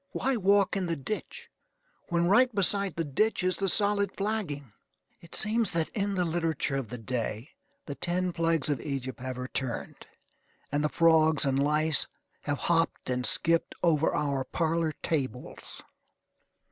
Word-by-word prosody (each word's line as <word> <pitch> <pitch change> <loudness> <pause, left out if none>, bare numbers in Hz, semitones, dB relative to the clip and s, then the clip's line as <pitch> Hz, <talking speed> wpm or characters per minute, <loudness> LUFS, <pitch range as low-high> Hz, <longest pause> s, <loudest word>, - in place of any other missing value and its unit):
Why 270 0 0
walk 200 -2 +3
in 190 -2 -1
the 165 - -1
ditch, 165 +9 -6 0.6
when 170 -1 +2
right 245 +8 +5
beside 200 -2 +2
the 165 - -1
ditch 185 +8 0
is 185 0 +1
the 195 -1 0
solid 200 0 +2
flagging? 185 - -3 0.5
It 170 - -9
seems 220 +1 +2
that 165 -1 0
in 200 -1 -2
the 180 -1 +1
literature 165 -4 0
of 135 -4 -3
the 125 - -5
day 115 +1 -4 0.3
the 145 - -5
ten 180 +4 -2
plagues 165 -3 +1
of 140 - -2
Egypt 135 -2 -4
have 130 0 -5
returned, 125 -1 -4 0.6
and 145 +1 0
the 150 - +2
frogs 160 -2 +4
and 135 0 +1
lice 150 +2 +2 0.4
have 145 -1 -1
hopped 165 -5 0
and 125 0 0
skipped 165 0 +1
over 160 -3 +3
our 140 -3 0
parlor 165 +2 0
tables. 130 -5 -4
165 Hz, 155 wpm, -29 LUFS, 140-185 Hz, 0.6 s, right